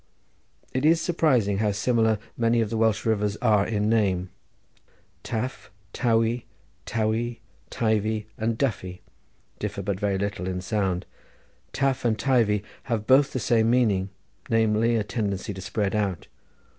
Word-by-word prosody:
It 130 - -1
is 160 +2 +5
surprising 125 - +2
how 105 -1 +1
similar 110 +1 +2 0.2
many 115 0 +2
of 110 -2 0
the 115 - -1
Welsh 110 -2 +1
rivers 105 -2 0
are 105 -4 +3
in 105 -2 0
name: 95 -5 +1 0.9
Taf, 120 +3 -4 0.3
Tawey, 115 -1 +1 0.4
Towey, 115 +1 -1 0.3
Teivi, 110 -1 0
and 110 +1 -1
Duffy 95 -9 -2 0.6
differ 100 - -4
but 95 0 -2
very 100 -2 0
little 100 -2 -3
in 90 -1 -2
sound. 95 -1 -1 0.7
Taf 135 -1 0
and 115 -3 +1
Teivi 110 -4 +2 0.2
have 115 -3 -2
both 135 +3 +5
the 130 - -2
same 115 -1 +2
meaning, 105 -6 +2 0.4
namely 115 +1 +2
a 110 - +1
tendency 105 -2 -3
to 95 - -8
spread 100 +1 -1
out. 100 -5 -1
110 Hz, 140 wpm, -25 LUFS, 100-120 Hz, 0.9 s, is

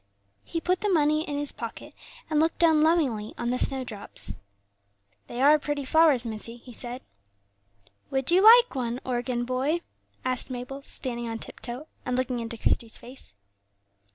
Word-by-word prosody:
He 335 - -4
put 365 +2 -1
the 420 - 0
money 305 -3 +2
in 290 - -3
his 290 0 0
pocket, - - -8 0.3
and 310 -1 0
looked 320 +1 +1
down 320 -3 +4
lovingly 285 -10 +1
on 240 0 -2
the 250 - -1
snowdrops. 250 -7 +2 0.9
"They 240 - -7
are 300 +2 +6
pretty 290 -1 -3
flowers, 300 -4 +4
missie," 230 +1 -2
he 245 +1 -14
said. 245 +2 -5 1.1
"Would 265 +2 +2
you 365 +2 +5
like 470 +3 +7
one, 245 -2 -3
organ 240 -1 -2
boy?" 265 +7 -1 0.4
asked 255 0 +1
Mabel, 255 +2 -6
standing 240 -4 -4
on 225 - -4
tip - - -8
toe, 250 +5 -6 0.2
and 250 0 -2
looking 255 -1 -1
into 230 0 -5
Christie's 225 +1 -1
face. 245 - -11
260 Hz, 160 wpm, -26 LUFS, 240-305 Hz, 1.1 s, like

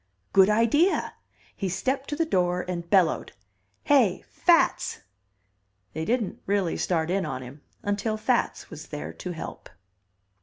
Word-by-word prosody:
"Good 190 0 +6
idea." 230 - +2 0.4
He 195 - -2
stepped 265 +9 -2
to 295 - -2
the 330 +2 +1
door 180 - +1
and 170 -2 -4
bellowed, 185 -6 +2 0.5
"Hey, 245 -11 +3
Fats!" 345 -2 +2 0.9
They 160 +1 -3
didn't 230 0 -1
really 195 -4 +1
start 165 -1 0
in 195 0 +1
on 135 -5 -4
him 135 +4 -11 0.2
until 205 +2 -1
Fats 215 - -1
was - - -9
there 75 +3 -6
to 180 - -6
help. 160 - -8
190 Hz, 140 wpm, -26 LUFS, 170-230 Hz, 0.9 s, Good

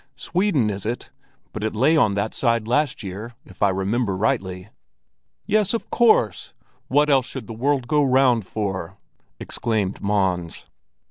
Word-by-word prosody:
"Sweden, 145 - 0
is 100 -1 -5
it? 115 +3 -4 0.4
But 105 - -5
it 110 0 -2
lay 135 +9 +3
on 110 -10 +3
that 100 +2 -2
side 115 -3 0
last 130 0 0
year, 105 +5 -7
if 95 - -17
I 100 - +5
remember 95 +2 -1
rightly." 95 -2 -1 0.8
"Yes, 215 0 +2
of 230 - -6
course! 215 - +2 0.3
What 145 +2 +3
else 135 -3 +3
should 130 -4 -7
the 115 - -8
world 130 +2 0
go 150 +2 +3
round 130 -6 +3
for?" 95 -3 -4 0.4
exclaimed 105 -4 -2
Mons. 95 -4 -1
110 Hz, 150 wpm, -22 LUFS, 100-135 Hz, 0.8 s, I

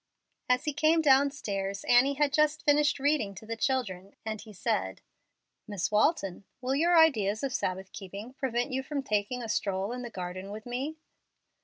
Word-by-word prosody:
As 250 +4 +2
he 300 - -1
came 310 +3 +3
down 280 -2 +5
stairs, 200 -8 -4
Annie 260 +3 +4
had 290 0 +1
just 305 0 +2
finished 295 0 +4
reading 275 -8 0
to 205 - -10
the 230 +1 -4
children, 210 -7 -2
and 220 -1 -4
he 220 - -12
said, 95 - -2 0.7
"Miss 200 -4 -2
Walton, 210 - +1 0.2
will 255 +1 -1
your 335 +5 +4
ideas 220 -10 +4
of 270 -2 -1
Sabbath 190 -4 -2
keeping 200 +5 -8
prevent 260 -1 -1
you 260 +1 -1
from 280 +1 -4
taking 215 +2 -1
a - - -5
stroll 195 -1 -1
in 250 0 -4
the 240 - -6
garden 185 -1 -6
with 215 +1 -8
me?" 265 +6 -4
245 Hz, 180 wpm, -29 LUFS, 200-280 Hz, 0.7 s, down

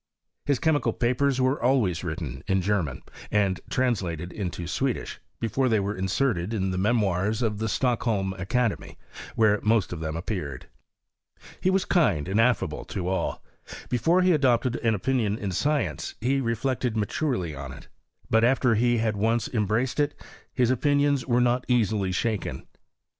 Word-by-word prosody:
His 140 -2 +3
chemical 150 -1 +1
papers 130 +2 +1
were 130 +1 +1
always 115 -10 +2
written 80 -7 -5
in 95 -1 +1
German, 85 -10 -1 0.3
and 100 -3 +1
translated 90 -9 -1
into 90 -4 -4
Swedish, 130 +8 -2 0.2
before 130 +3 0
they 110 - +3
w 100 +1 -1
aerted 95 +1 0
in 95 -2 -1
the 90 - -2
Memoirs 105 0 +1
of 105 -3 -1
the 110 - -1
Stocklwlm 110 -5 0 0.7
/ - - -14
where 105 -2 +3
most 110 -4 +2
of 85 - -6
them 80 0 -3
appeared. 85 - -4 0.9
He 185 - +1
was 190 0 +2
kind 100 - +2
and 100 +4 +2
affable 120 -2 +1
to 90 -2 -4
all. 95 - -2 0.5
Before 165 +9 +2
he 185 - +4
adopted 130 -5 +2
va 115 - +2
opinion 110 -1 0
in 100 -3 -3
science, 145 - -1
he 135 +3 +1
reflected 120 0 -1
maturely 105 - -1
on 70 -1 -7
it; 70 - -12 0.4
but, 110 0 +3
after 125 0 +3
he 120 +2 +2
had 110 -1 0
once 115 +3 +1
embraced 115 +4 0
it, 145 0 0 0.3
his 125 -2 +2
opinions 145 +1 +2
wera 120 -1 +3
not 125 +1 +1
easily 110 -5 +1
ahaken. 105 +3 -2
115 Hz, 155 wpm, -26 LUFS, 95-130 Hz, 0.9 s, he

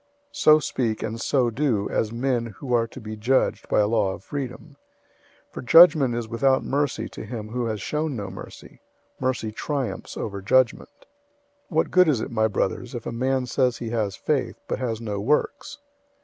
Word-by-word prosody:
002:012 285 - -42 0.3
So 155 - +7
speak, 115 -6 -2
and 115 +1 -4
so 130 -4 +2
do, 115 -6 0
as 110 - 0
men 120 0 -1
who 130 -3 -4
are 115 -1 +3
to 125 - -11
be 110 -2 -7
judged 120 +5 0
by - - +3
a 105 - +2
law 105 -4 +1
of 90 - -10
freedom. 140 +2 -6 0.7
002:013 - - -41
For - - -6
judgment 150 -3 +7
is 120 -1 -3
without 130 +4 +2
mercy 140 -5 -1
to - - -8
him 110 -1 -6
who 120 +1 -2
has 110 -3 -3
shown 150 -1 -2
no 100 -4 -5
mercy. 95 - -11 0.4
Mercy 125 -4 -1
triumphs 135 +3 -4
over 100 -2 -4
judgment. 125 +5 +2 0.8
002:014 165 - -9
What 160 - +2
good 180 -1 +5
is 145 -7 +2
it, - - -5
my 110 -1 +2
brothers, 120 +4 -2
if 120 - -6
a - - -3
man 130 +2 0
says 125 -1 +1
he 115 -2 -5
has 105 -4 -1
faith, 135 -6 -2
but - - -2
has 115 -4 -2
no 105 -3 -4
works? 150 - -1
120 Hz, 195 wpm, -24 LUFS, 110-135 Hz, 0.8 s, So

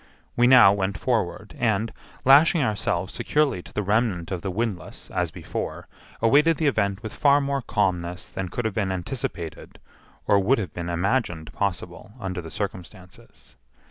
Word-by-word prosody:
We 120 0 +4
now 125 -6 +8
went 100 0 -2
forward, 105 -5 -2
and, 110 -1 0 0.3
lashing 150 +4 +6
ourselves 100 -5 -1
securely 150 -11 0
to - - -14
the 105 - -2
remnant 100 -3 0
of 90 -3 -3
the 95 - -3
windlass 105 -1 -4
as - - -1
before, - - -6 0.4
awaited 150 +7 +4
the 160 - -1
event 100 -6 0
with 110 - -6
far 145 -1 +4
more 140 -1 -1
calmness 90 -5 -2
than 95 -1 -4
could 120 +6 -4
have 110 - -1
been 100 -2 -1
anticipated 90 -3 -5 0.5
or 100 - +4
would 115 +8 +3
have 90 -8 -4
been 85 0 -5
imagined 85 -2 -1
possible 95 0 -4
under 95 -4 -4
the 80 - -9
circumstances. 90 +1 -8
100 Hz, 160 wpm, -24 LUFS, 90-120 Hz, 0.5 s, now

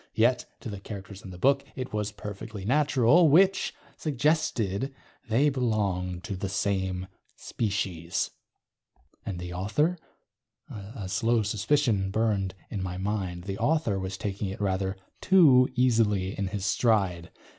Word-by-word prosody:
Yet, 120 +2 +3 0.2
to - - -6
the 100 - -6
characters 100 -1 -8
in 95 - -10
the 90 - -9
book, 140 +7 +3
it 130 -3 -5
was 105 -1 -1
perfectly 105 0 -7
natural 145 - +4
which 190 +6 +4 0.3
suggested 135 - 0 0.3
they 125 +7 +4
belonged 100 -9 -1
to 100 - -4
the 95 +1 -3
same 95 -1 -1 0.3
species. 95 -6 -2 1.0
And 95 -4 -3
the 90 0 -6
author? 150 - 0 0.7
A 100 0 -7
slow 115 +4 +1
suspicion 105 -1 +1
burned 100 -3 0 0.2
in 100 - -3
my 90 -1 -4
mind. 95 -3 -3
The 95 +1 -5
author 150 -11 +1
was 95 +1 -4
taking 100 0 -3
it 95 - -6
rather 95 -1 -1 0.2
too 145 -10 +6
easily 110 -6 +2
in 100 - -2
his 100 0 -4
stride. 95 -5 +1
105 Hz, 135 wpm, -27 LUFS, 95-125 Hz, 1.0 s, too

